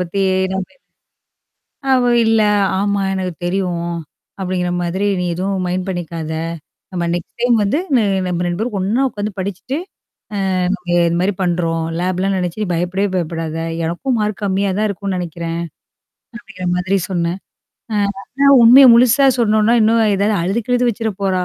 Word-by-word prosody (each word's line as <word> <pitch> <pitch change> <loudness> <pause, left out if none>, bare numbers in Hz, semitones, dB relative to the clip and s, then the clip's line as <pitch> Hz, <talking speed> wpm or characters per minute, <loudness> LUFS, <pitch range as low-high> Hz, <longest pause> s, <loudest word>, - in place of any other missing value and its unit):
பத்தி 180 +2 -2 0.3
நம்ம 190 -1 -3 1.2
அவ," 255 -1 +4 0.2
இல்ல, 225 0 +3 0.4
ஆமா 200 0 0
எனக்கு 185 -1 -2
தெரியும். 175 -2 -1 0.5
அப்டிங்கிற 180 -1 -1
மாதிரி 180 +3 -2 0.2
நீ - - -1
எதுவும் 190 +1 -2
மைண்ட் 180 +1 -2
பண்ணிக்காத? 165 -3 -4 0.6
ஆமா 175 - -1
நெக்ஸ்ட் 175 -2 -6
டைம் 245 0 +3
வந்து 205 +10 +1 0.2
ந - - +5 0.3
நம்ம 180 -1 -1
2 175 0 -2
பேரும் 220 0 -2
ஒண்ணா 210 +7 0
உ்க்காந்து 210 -3 -4
படிச்சுட்டு 200 +8 -4 0.9
அ - - +1
நீங்க 180 -2 -5
இது 170 0 0
மாரி 195 +3 +1
பண்றோம் 170 -2 0 0.2
லேப் 185 +1 -1
லாம் 195 0 +1
நெனச்சு 180 +2 -3
நீ - - -1
பயப்படவே 180 +4 -1
பயப்படாத. 165 -2 -3 0.3
எனக்கும் 235 +10 -1
மார்க் 210 0 -2
கம்மியா 195 0 0
தான் 215 0 +1
இருக்கும்ன்னு 200 -1 -3
நெனைக்கிறேன்." 170 -1 -4 0.8
அப்டிங்கிற 195 -5 -7
மாதிரி 185 +2 0
சொன்னேன். 175 0 -1 0.5
அ - - 0 0.3
ஆனா 275 +6 -1 0.2
உண்மைய 255 +4 +9
முழுசா 255 +3 +5
சொன்னோனா, 220 0 +3
இன்னும் 225 +1 +3
ஏதாவது 205 +2 +1
அழுது 195 +7 0
கிழுது 245 0 +2
வச்சுர 225 0 -3
போறா? 185 -2 +1
190 Hz, 155 wpm, -18 LUFS, 175-215 Hz, 1.2 s, உண்மைய